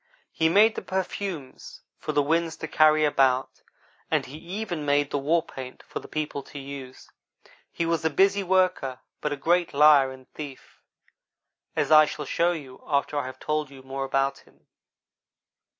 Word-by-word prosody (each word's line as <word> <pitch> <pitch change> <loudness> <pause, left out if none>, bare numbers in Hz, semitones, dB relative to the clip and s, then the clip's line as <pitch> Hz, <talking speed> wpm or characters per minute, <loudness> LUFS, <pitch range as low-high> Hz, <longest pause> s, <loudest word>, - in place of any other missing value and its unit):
He 160 0 +2
made 215 +5 +5
the - - -5
perfumes 185 -6 -5 0.2
for - - -3
the 145 - +2
winds 165 +2 0
to 160 - -5
carry 155 0 +4
about, 135 -3 +1 0.5
and - - +1
he 140 +4 -9
even 175 -2 -5
made 145 0 +1
the 145 - 0
war 160 +4 +2
paint 130 -4 -9
for - - -6
the - - -12
people 150 -2 -3
to 140 - -12
use. 135 -2 -9 0.6
He 170 - -2
was 165 -1 0
a 160 - +2
busy 195 +5 +3
worker, 185 -8 +1 0.2
but 150 - -1
a 145 - -2
great 170 +2 +1
liar 145 -2 +6
and 130 -1 -13
thief, 145 -3 -10 0.9
as - - 0
I 155 0 +9
shall 150 0 -5
show 170 +5 +1
you 140 -7 -8
after 145 0 0
I 130 - -3
have 130 - -8
told 150 -2 -2
you 135 -1 -13
more 135 +1 -4
about 135 0 0
him. - - -25
150 Hz, 175 wpm, -26 LUFS, 135-170 Hz, 0.9 s, I